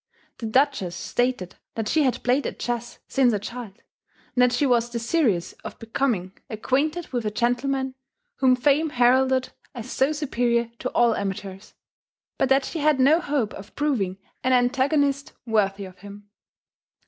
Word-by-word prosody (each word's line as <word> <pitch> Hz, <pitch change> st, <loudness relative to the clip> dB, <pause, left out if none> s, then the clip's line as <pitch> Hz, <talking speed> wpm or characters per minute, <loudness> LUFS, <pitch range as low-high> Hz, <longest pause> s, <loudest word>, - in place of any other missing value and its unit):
The 230 Hz, -, -4 dB
Duchess 255 Hz, -7 st, +1 dB
stated 245 Hz, -3 st, -2 dB, 0.2 s
that 225 Hz, -2 st, -2 dB
she 315 Hz, -, +2 dB
had 260 Hz, -4 st, 0 dB
played 255 Hz, +3 st, +2 dB
at -, -, -6 dB
chess 240 Hz, -1 st, -4 dB
since 255 Hz, -3 st, +3 dB
a -, -, +1 dB
child, 210 Hz, 0 st, -8 dB, 0.5 s
and 250 Hz, -, +2 dB
that 250 Hz, 0 st, +5 dB
she 250 Hz, +4 st, +1 dB
was 240 Hz, -2 st, +2 dB
desirous 235 Hz, -, 0 dB
of -, -, -8 dB
becoming 225 Hz, -5 st, -2 dB
acquainted 285 Hz, +9 st, -1 dB
with 245 Hz, -3 st, -2 dB
a 210 Hz, -, 0 dB
gentleman 260 Hz, +4 st, 0 dB, 0.4 s
whom 260 Hz, -2 st, +4 dB
fame 290 Hz, +5 st, +2 dB
heralded 260 Hz, 0 st, +3 dB, 0.3 s
as 245 Hz, +1 st, -7 dB
so 265 Hz, +3 st, +2 dB
superior 240 Hz, -6 st, 0 dB
to 255 Hz, -, -2 dB
all 235 Hz, -1 st, +4 dB
amateurs; 195 Hz, 0 st, -5 dB, 0.6 s
but -, -, +2 dB
that 270 Hz, 0 st, +3 dB
she 330 Hz, -, -4 dB
had 300 Hz, -2 st, +3 dB
no 290 Hz, +6 st, +5 dB
hope 280 Hz, -10 st, -1 dB
of 200 Hz, +2 st, -11 dB
proving 230 Hz, -11 st, 0 dB, 0.3 s
an 255 Hz, 0 st, +2 dB
antagonist 275 Hz, +3 st, +1 dB
worthy 200 Hz, -3 st, 0 dB
of 185 Hz, -1 st, -13 dB
him. 205 Hz, +1 st, -12 dB
245 Hz, 160 wpm, -24 LUFS, 220-275 Hz, 0.6 s, that